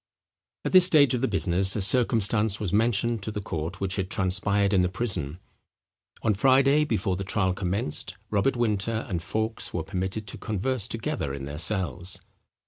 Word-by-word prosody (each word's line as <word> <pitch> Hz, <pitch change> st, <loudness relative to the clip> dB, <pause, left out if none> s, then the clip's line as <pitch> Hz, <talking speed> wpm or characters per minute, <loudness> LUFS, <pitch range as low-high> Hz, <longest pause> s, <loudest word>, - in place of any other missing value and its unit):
At -, -, -1 dB
this 185 Hz, -1 st, +8 dB
stage 145 Hz, -7 st, +4 dB
of 125 Hz, -, -1 dB
the 135 Hz, -, +1 dB
business 95 Hz, -1 st, +3 dB
a 105 Hz, -, -1 dB
circumstance 110 Hz, -2 st, +2 dB
was 100 Hz, -4 st, -3 dB
mentioned 115 Hz, +1 st, +2 dB
to 100 Hz, -, -3 dB
the 105 Hz, -, -4 dB
court 85 Hz, -2 st, -5 dB
which 95 Hz, 0 st, -2 dB
had 95 Hz, -1 st, -2 dB
transpired 100 Hz, +2 st, +1 dB
in 95 Hz, -, +4 dB
the 90 Hz, -, +1 dB
prison. 90 Hz, -7 st, -2 dB, 0.9 s
On 110 Hz, -, +2 dB
Friday 135 Hz, +7 st, +4 dB
before 105 Hz, -7 st, -1 dB
the 95 Hz, -, -4 dB
trial 95 Hz, -1 st, 0 dB
commenced 95 Hz, -1 st, -2 dB
Robert 110 Hz, +6 st, +1 dB
Winter 110 Hz, -1 st, -1 dB
and 90 Hz, -5 st, -3 dB
Fawkes 110 Hz, +5 st, -3 dB
were 85 Hz, -, -1 dB
permitted 95 Hz, +4 st, -4 dB
to 95 Hz, -, -7 dB
converse 110 Hz, +2 st, -2 dB
together 115 Hz, -, -3 dB
in 70 Hz, -1 st, -6 dB
their 70 Hz, +2 st, -6 dB
cells. 90 Hz, -2 st, -1 dB
100 Hz, 175 wpm, -26 LUFS, 95-115 Hz, 0.9 s, this